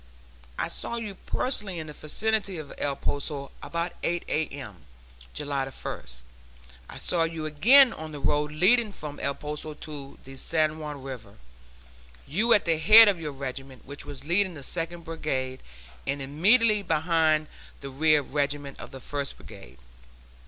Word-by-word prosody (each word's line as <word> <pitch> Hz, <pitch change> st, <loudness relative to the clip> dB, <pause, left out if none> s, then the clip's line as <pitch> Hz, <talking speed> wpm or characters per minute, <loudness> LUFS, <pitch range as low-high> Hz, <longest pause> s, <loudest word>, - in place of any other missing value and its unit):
I -, -, -1 dB
saw 235 Hz, -, -4 dB
you 220 Hz, -4 st, -4 dB
personally 200 Hz, -1 st, -2 dB
in 160 Hz, -, -4 dB
the 150 Hz, -, -8 dB
vicinity 200 Hz, +5 st, -1 dB
of 155 Hz, -3 st, -7 dB
El 140 Hz, -1 st, 0 dB
Poso, 140 Hz, 0 st, -3 dB
about 170 Hz, +1 st, -3 dB
8 175 Hz, 0 st, -1 dB
A.M., 140 Hz, -, -3 dB, 0.6 s
July 145 Hz, -2 st, -1 dB
1st. 65 Hz, -, -8 dB, 0.7 s
I -, -, -9 dB
saw 175 Hz, -, +1 dB
you 165 Hz, -1 st, -1 dB
again 230 Hz, -, +6 dB
on 160 Hz, 0 st, -7 dB
the 150 Hz, -, -7 dB
road 150 Hz, +1 st, +1 dB
leading 210 Hz, +8 st, +4 dB
from 150 Hz, -6 st, -8 dB
El 140 Hz, 0 st, -1 dB
Poso 150 Hz, +1 st, -6 dB
to 145 Hz, -2 st, -9 dB
the 135 Hz, 0 st, -11 dB
San 155 Hz, +1 st, 0 dB
Juan 150 Hz, -3 st, -6 dB
River; 125 Hz, -7 st, -8 dB, 0.9 s
you 205 Hz, +11 st, 0 dB
were 235 Hz, -, +7 dB
at 205 Hz, -, +1 dB
the 165 Hz, -2 st, +2 dB
head 220 Hz, +6 st, +10 dB
of 195 Hz, -4 st, +2 dB
your 155 Hz, -2 st, -4 dB
regiment, 135 Hz, -1 st, -7 dB
which 140 Hz, +1 st, -8 dB
was 145 Hz, -2 st, -8 dB
leading 185 Hz, +2 st, +2 dB
the 140 Hz, -, -9 dB
Second 170 Hz, +2 st, -4 dB
Brigade, 130 Hz, -6 st, -3 dB, 0.5 s
and 140 Hz, -, -1 dB
immediately 205 Hz, -, +4 dB
behind 160 Hz, -3 st, +2 dB, 0.4 s
the 140 Hz, -1 st, -6 dB
rear 150 Hz, +2 st, +4 dB
regiment 145 Hz, 0 st, -2 dB
of -, -, -8 dB
the 135 Hz, -, -10 dB
First 140 Hz, +1 st, -4 dB
Brigade. 65 Hz, +2 st, -13 dB
155 Hz, 160 wpm, -27 LUFS, 140-175 Hz, 0.9 s, head